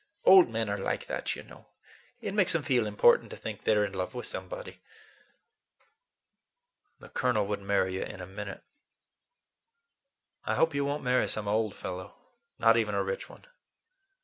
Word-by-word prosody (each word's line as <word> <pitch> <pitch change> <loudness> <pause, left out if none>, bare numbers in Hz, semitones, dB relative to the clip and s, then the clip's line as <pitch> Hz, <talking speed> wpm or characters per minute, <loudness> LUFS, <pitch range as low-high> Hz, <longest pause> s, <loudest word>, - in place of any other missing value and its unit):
Old 190 -7 +8
men 115 -1 -1
are 100 0 -2
like 95 - -2
that, - - -3
you - - -9
know. - - -16 0.5
It - - -4
makes 205 -4 +3
them 165 -3 0
feel 125 -7 +2
important 105 -1 +4
to - - -8
think - - -7
they're 105 -1 +4
in 100 - -6
love 95 +5 -4
with 125 - -5
somebody." - - -7 2.2
"The - - -13
Colonel 125 -5 +1
would 100 0 -3
marry 100 -1 +1
you 95 - -3
in 105 - -8
a 90 - -6
minute. 100 +1 -7 1.8
I - - -1
hope 160 -1 +3
you 140 0 0
won't 145 +1 -2
marry 125 0 +2
some 105 -1 -4
old 110 0 0
fellow; 90 0 -7 0.4
not 115 0 +5
even 105 -3 0
a 100 - +1
rich 95 0 -4
one." - - -15
105 Hz, 170 wpm, -29 LUFS, 100-130 Hz, 2.2 s, Old